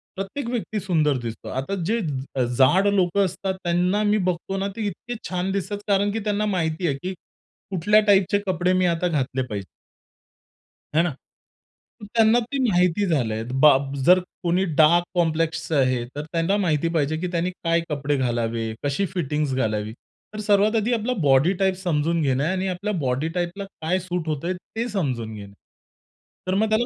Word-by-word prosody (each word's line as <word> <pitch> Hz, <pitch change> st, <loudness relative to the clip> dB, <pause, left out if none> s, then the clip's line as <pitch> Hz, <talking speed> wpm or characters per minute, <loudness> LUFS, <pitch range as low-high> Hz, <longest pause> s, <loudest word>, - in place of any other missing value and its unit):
प्रत्येक 195 Hz, +7 st, -4 dB
व्यक्ती 220 Hz, -3 st, -2 dB
सुंदर 160 Hz, -7 st, +1 dB
दिसतो. 115 Hz, -1 st, -6 dB
आता 135 Hz, +9 st, -3 dB
जे 225 Hz, +5 st, +1 dB
ज 135 Hz, -5 st, -2 dB
जाड 185 Hz, +10 st, +5 dB
लोकं 195 Hz, +1 st, +2 dB
असतात 190 Hz, +1 st, -3 dB
त्यांना 180 Hz, +4 st, +1 dB
मी 210 Hz, 0 st, +3 dB
बघतो 180 Hz, +2 st, -3 dB
ना, 195 Hz, +1 st, -1 dB
ते 225 Hz, -, -3 dB
इतके 240 Hz, +6 st, -6 dB
छान 180 Hz, +1 st, -1 dB
दिसतात. 200 Hz, +1 st, -2 dB
कारण 200 Hz, 0 st, +2 dB
की 225 Hz, -, -2 dB
त्यांना 210 Hz, 0 st, 0 dB
माहिती 175 Hz, -3 st, -1 dB
आहे 140 Hz, -, 0 dB
की 185 Hz, +1 st, -3 dB, 0.6 s
कुठल्या 200 Hz, +4 st, +4 dB
टाइपचे 200 Hz, 0 st, +4 dB
कपडे 180 Hz, 0 st, +1 dB
मी 185 Hz, 0 st, +2 dB
आता 170 Hz, 0 st, +1 dB
घातले 135 Hz, -5 st, -1 dB
पाहिजेत. 105 Hz, -6 st, -4 dB, 1.3 s
है 160 Hz, -, +5 dB
ना? 175 Hz, -, 0 dB, 0.9 s
तर -, -, -7 dB
त्यांना 225 Hz, +1 st, +5 dB
ते 245 Hz, +4 st, -4 dB
माहिती 180 Hz, +1 st, +2 dB
झालंय 115 Hz, -9 st, 0 dB, 0.2 s
बाब. 140 Hz, -1 st, +4 dB
जर 180 Hz, +1 st, +7 dB, 0.2 s
कोणी 175 Hz, +2 st, +2 dB, 0.2 s
डार्क 170 Hz, +3 st, +5 dB
कॉम्प्लेक्सचं 165 Hz, -1 st, 0 dB
आहे 130 Hz, -2 st, +1 dB
तर 145 Hz, -, -3 dB
त्यांना 170 Hz, +4 st, +1 dB
माहिती 165 Hz, -5 st, +1 dB
पाहिजे 155 Hz, 0 st, +1 dB
की 180 Hz, +3 st, -2 dB
त्यांनी 175 Hz, +1 st, 0 dB
काय 170 Hz, -2 st, 0 dB
कपडे 145 Hz, -1 st, -1 dB
घालावे, 115 Hz, -3 st, -1 dB
कशी 145 Hz, +8 st, 0 dB
फिटिंगज् 150 Hz, -5 st, -1 dB
घालावी. 110 Hz, -3 st, -1 dB, 0.4 s
तर 215 Hz, -, -6 dB
सर्वात 210 Hz, +1 st, +3 dB
आधी 225 Hz, +2 st, +1 dB
आपला 235 Hz, +2 st, 0 dB
बॉडी 135 Hz, +7 st, +4 dB
टाइप 190 Hz, -1 st, +3 dB
समजून 170 Hz, -2 st, 0 dB
घेणं 135 Hz, -2 st, +1 dB
आणि 185 Hz, +3 st, -1 dB
आपल्या 190 Hz, +3 st, -2 dB
बॉडी 135 Hz, +3 st, -1 dB
टाइपला, 175 Hz, +3 st, -2 dB, 0.2 s
काय 180 Hz, +4 st, +1 dB
सूट 180 Hz, -2 st, -4 dB
होतय 155 Hz, +4 st, -2 dB
ते 225 Hz, +6 st, -5 dB
समजून 130 Hz, -, -2 dB
घेणं. 100 Hz, -1 st, -10 dB, 0.9 s
तर 185 Hz, -, 0 dB
मग 215 Hz, +2 st, +2 dB
त्याला 220 Hz, +2 st, +2 dB
175 Hz, 170 wpm, -23 LUFS, 145-200 Hz, 1.3 s, जर